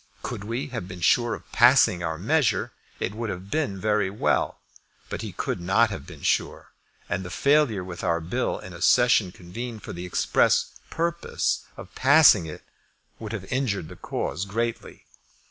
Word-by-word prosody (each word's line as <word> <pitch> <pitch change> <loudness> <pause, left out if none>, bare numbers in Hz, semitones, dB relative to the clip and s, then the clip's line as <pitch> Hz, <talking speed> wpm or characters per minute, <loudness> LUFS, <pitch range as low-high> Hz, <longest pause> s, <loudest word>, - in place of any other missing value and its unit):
Could 115 -5 -5
we 115 +6 -3
have 115 -8 -5
been 90 -1 -8
sure 120 +7 +3
of - - -15
passing 120 -7 +5
our 80 -2 -2
measure, 135 - +1 0.3
it 95 - -2
would 115 0 -4
have 95 +1 -7
been 145 -11 -1
very 105 -1 +1
well; 100 - 0 0.5
but - - -3
we - - -5
could - - -3
not 110 +6 +3
have 95 - -7
been - - -12
sure, - - -1 0.4
and 90 0 -3
failure 140 -9 +2
with 90 -1 -8
our 85 0 +1
bill 90 +11 -2
in 95 - -10
a 85 - -10
session 120 -3 +4
convened 110 +6 -8
for - - -7
the 90 +1 -6
express - - +2 0.2
purpose 170 +1 -1
of - - -11
passing 135 - +6
it 75 - -9 0.6
would 110 -2 -6
have 105 -5 -5
injured 105 -11 -1
the - - -10
cause 90 - -3
greatly. 115 +3 -4
105 Hz, 170 wpm, -25 LUFS, 90-125 Hz, 0.6 s, passing